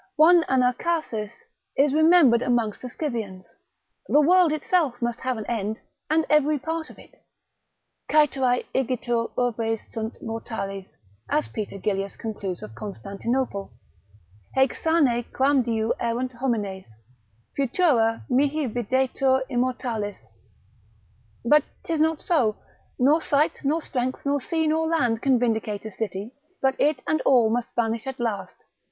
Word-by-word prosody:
One 335 +2 +6
Anacharsis 250 -3 0 0.5
is 280 0 +3
remembered 315 -6 +5
amongst 235 -4 0
the 250 - -6
Scythians; 220 - -5 0.5
the 295 - +4
world 350 +2 +5
itself 310 -4 0
must 240 -1 -2
have 255 -2 -2
an 215 - -5
end; 220 -2 -2 0.3
and 315 +1 +2
every 300 0 +3
part 320 +3 -4
of - - -14
it. - - -18 0.9
Caeterae 265 -5 +3
igitur 240 -2 0
urbes 225 -2 -1
sunt 225 +1 -4
mortales, 195 -4 -5 0.4
as 135 -8 0
Peter 200 - -5
Gillius 195 0 -2
concludes 200 -5 -5
of 105 - -9
Constantinople, 200 - -4 0.8
haec 265 -1 +4
sane 285 -8 +2
quamdiu 245 -5 +2
erunt 240 +2 -1
homines, 215 -7 -2 0.7
futura 255 -5 +2
mihi 285 +3 +1
videtur 260 +3 +1
immortalis; 240 -4 -2 1.3
but 300 +4 +5 0.2
'tis 325 -2 -1
not 320 0 +1
so: 240 -12 +2 0.4
nor 290 +6 +4
site, 295 +1 +1
nor 295 +4 +1
strength, 255 +1 -3
nor 285 0 +1
sea 320 +3 -1
nor 320 +1 +1
land, 245 -9 +1
can 265 -2 +3
vindicate 220 -3 -1
a 220 - -5
city, 205 +2 -5 0.3
but 265 0 +2
it 300 +2 +1
and 310 - +1
all 240 -5 +4
must 240 +1 -1
vanish 230 +1 -1
at 265 -1 -5
last. 220 -5 -3
245 Hz, 130 wpm, -25 LUFS, 225-290 Hz, 1.3 s, One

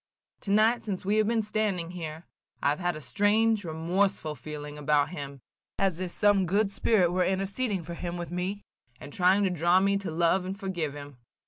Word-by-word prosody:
Tonight, 215 +4 +3
since 190 -3 -5
we 205 +2 +2
have 215 -1 +3
been 225 -1 +1
standing 205 -5 -1
here, 160 -2 -7 0.4
I - - +4
have 150 - -1
had 175 -2 -1
a 155 - -7
strange, 205 - +2
remorseful 170 +1 0
feeling 150 +1 -8
about 145 -1 +2
him, 140 -5 -7 0.4
as 190 -4 0
if 185 -1 -3
some 200 0 +3
good 200 +3 +1
spirit 200 -4 +2
were 180 +1 +2
interceding 195 +2 -1
for 170 +2 -7
him 175 0 -5
with 175 -1 -6
me, 185 +3 -3 0.4
and 145 - -10
trying 190 +3 +3
to 190 - +1
draw 175 +2 +3
me 200 +1 +2
to 195 - -5
love 170 +3 +2
and 190 +2 -5
forgive 175 -7 -3
him. 145 -2 -10
180 Hz, 195 wpm, -28 LUFS, 160-200 Hz, 0.4 s, I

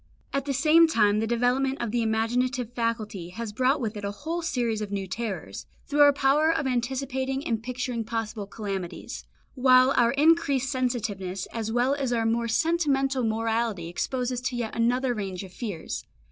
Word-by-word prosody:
At 275 -1 -1
the 285 - -1
same 315 +5 +5
time 210 -8 +3
the 225 - 0
development 250 +3 +1
of 235 -3 -2
the 240 +1 +1
imaginative 240 +2 0
faculty 220 -7 -2
has 220 +3 -6
brought 260 +6 +2
with 225 -4 -3
it 205 - -6
a 200 - -1
whole 315 +11 -4
series 240 -9 -1
of 210 -1 -4
new 200 -1 -2
terrors, 210 +1 -5 0.2
through 295 - -2
our 290 0 +8
power 280 +3 +3
of 320 -3 -1
anticipating 265 +2 -2
and 225 -2 -1
picturing 250 -1 -3
possible 220 -2 -4
calamities; 195 -4 -5 0.3
while 255 0 +5
our 235 -1 +4
increased 285 -3 +3
sensitiveness 220 -8 -2
as 225 -1 -3
well 245 +3 +2
as 275 -3 -1
our 230 -2 +1
more 230 +1 +1
sentimental 275 -2 +1
morality 225 -5 -1
expose 250 +8 -2
us 250 -1 -3
to 255 0 -2
yet 235 -2 -3
another 245 +2 +1
range 195 -4 -4
of 185 -1 -11
fears. 200 -9 -5
240 Hz, 175 wpm, -26 LUFS, 220-270 Hz, 0.3 s, our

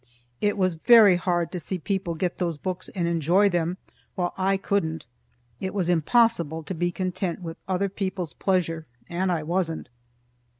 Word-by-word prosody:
It 205 0 +1
was 185 -2 +2
very 210 +2 +7
hard 175 -1 0
to 180 - -4
see 185 +3 -4
people 180 -1 -2
get 175 +2 -2
those 170 -4 -1
books 185 +3 -4
and 175 -3 0
enjoy 170 +5 +3
them 175 0 -1 0.4
while 175 -1 -1
I 195 +1 +1
couldn't. 165 -5 -1 0.5
It 190 +1 -4
was 180 -4 0
impossible 170 -3 +2
to 190 - -5
be 175 +1 -1
content 185 0 -3
with 165 -1 -6
other 190 +1 +1
people's 190 -4 -4
pleasure, 165 -4 0 0.2
and 185 +2 -1
I 165 -3 -1
wasn't. 165 -2 -2
180 Hz, 165 wpm, -25 LUFS, 170-190 Hz, 0.5 s, very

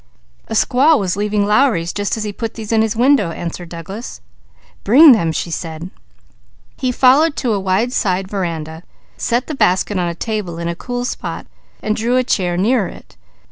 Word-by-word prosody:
"A - - -6
squaw 275 +7 +4
was 190 -4 -1
leaving 205 0 0
Lowry's 210 -6 +2
as 205 +2 -1
he 210 -1 -4
put 225 +2 -5
these 220 -1 -7
in 225 -1 +3
his 220 0 0
window," 245 -5 +3
answered 170 +1 -6
Douglas. 190 +8 -8 0.6
"Bring 285 +9 +8
them," 170 -9 +3
she 170 +1 -3
said. 165 +2 -6 0.8
He 255 -1 -1
followed 275 +5 +4
to 240 -4 -1
a 200 - 0
wide 195 +6 0
side 190 -5 0
veranda, 165 -5 -4 0.3
set 240 +2 -1
the 310 - -5
basket 205 -5 +1
on 175 - 0
a 170 - -4
table 210 -5 -4
in 170 0 -4
a 170 - -2
cool 245 +5 -4
spot, - - -5 0.4
then 215 - -1
drew 235 +3 0
a 255 - +2
chair 180 -7 0
near 210 +1 +2
it. - - -13
210 Hz, 180 wpm, -17 LUFS, 175-245 Hz, 0.8 s, Bring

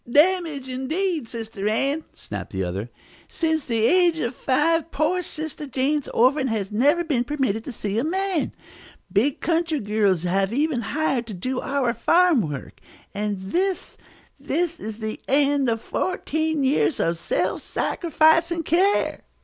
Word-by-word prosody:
"Damage, 305 -1 +3
indeed, 300 +3 -2
Sister 220 -3 -5
Ann!" 275 +8 +1
snapped 100 -2 -7
the 95 0 -1
other. 95 +6 -4 0.4
"Since 320 -3 -1
the 225 -2 +1
age 350 +2 +4
of 235 -5 -2
five, 310 +6 +1
poor 330 +4 0
Sister 310 -3 -5
Jane's 275 +3 0
orphan 265 +3 +3
has 215 -4 -2
never 290 +11 +3
been 280 -8 0
permitted 245 -5 -1
to - - -5
see 210 -2 -2
a - - 0
man. 375 +1 -1 0.6
Big 245 +8 +1
country 330 -2 +1
girls 205 -5 +1
have 195 +2 +1
even 290 +3 +1
been 225 -2 -5
hired 275 -6 0
to 215 - -6
do 255 +8 -3
our 270 -4 0
farm 345 -1 +4
work. 150 -7 -6 0.3
And 205 0 -2
this, 360 - -2 0.4
this 345 0 -1
is 215 0 -6
the 220 -1 -5
end 280 -1 +3
of 225 -1 0
fourteen 315 +1 -1
years 275 +3 +2
of 165 0 0
self - - -1
sacrificing 330 +1 +2
care!" 370 +6 +2
275 Hz, 150 wpm, -23 LUFS, 220-320 Hz, 0.6 s, age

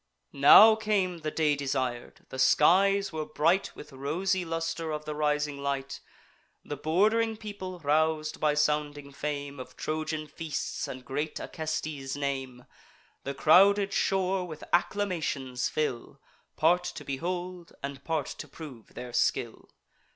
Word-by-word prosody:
Now 200 +11 +9
came 205 -5 0
the 155 -1 -3
day 150 -1 +1
desir'd. 130 -3 -3
The 130 - -7
skies 195 +7 +4
were 155 -1 -2
bright 165 +5 +1
With 150 - -11
rosy 180 +8 -1
luster 165 0 -3
of 150 0 -4
the 150 - -4
rising 150 -1 -1
light: 140 -1 -3 0.7
The 145 - -4
bord'ring 215 +9 +2
people, 200 -4 -7
rous'd 155 +1 +1
by 150 -1 +2
sounding 150 -1 0
fame 140 -1 -4
Of 130 - -10
Trojan 155 0 -3
feasts 155 +1 -4
and 130 -1 -8
great 150 +4 -3
Acestes' 155 -4 -4
name, 135 -3 -4 0.6
The 140 0 -3
crowded 200 +6 +5
shore 190 -1 +1
with 155 -3 -9
acclamations 165 -9 0
fill, 150 -6 -3 0.4
Part 175 +3 +3
to - - -8
behold, 175 +5 -4
and 140 0 -6
part 160 -4 -1
to 155 - -8
prove 140 -6 -11
their 125 -1 -7
skill. - - -1
155 Hz, 135 wpm, -28 LUFS, 140-180 Hz, 0.7 s, Now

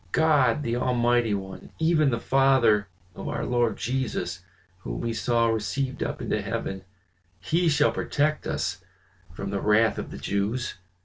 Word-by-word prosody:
God, 150 -4 +3
the 120 -2 -1
Almighty 120 -3 +2
One, 95 -1 -7
even 160 -2 +3
the 115 -2 -1
Father 130 -6 +3 0.3
of - - -7
our - - -2
Lord 120 -3 +1
Jesus, 130 0 -2 0.4
whom - - -5
we 115 - -2
saw 115 +1 +1
received 130 +4 -2
up - - -3
into - - -1
heaven, 95 -1 -4 0.6
he 165 - +1
shall 145 -1 +3
protect 150 +1 -1
us 95 +1 -2 0.5
from 100 +3 -5
the 100 -1 -2
wrath 105 +1 +3
of - - -5
the - - -8
Jews." 105 +5 -2
120 Hz, 150 wpm, -26 LUFS, 105-135 Hz, 0.6 s, God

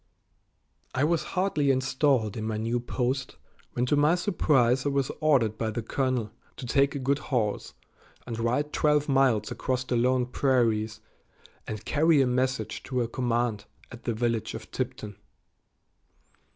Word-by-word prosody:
I 130 - +1
was 165 +1 +2 0.2
hardly 170 -7 +1
installed 130 -4 +1
in 110 - -4
my 110 -1 -2
new 115 +3 -1
post 125 +2 -2 0.4
when 125 - 0
to 135 - +2
my 150 +4 +4
surprise 135 - +2
I 145 - 0
was 140 -2 0
ordered 125 -9 +2
by 110 - 0
the 110 +1 -4
colonel 125 -3 -1 0.3
to - - -7
take 140 +4 +2
a - - -1
good 140 +1 0
horse 120 -8 -2 0.5
and 115 -2 -5
ride 125 +6 0
twelve 150 -1 +2
miles 135 -6 +2
across 130 -1 -2
the 125 -1 -2
lone 125 +1 +2
prairies 115 -4 +1 0.7
and 110 0 -6
carry 155 0 +3
a 135 - +4
message 125 -2 -1
to 125 -2 -1
a - - -2
command 120 -3 -1 0.3
at 120 - -11
the 120 - 0
village 115 -1 -1
of - - -9
Tipton. 105 -2 -4
125 Hz, 155 wpm, -27 LUFS, 115-140 Hz, 0.7 s, my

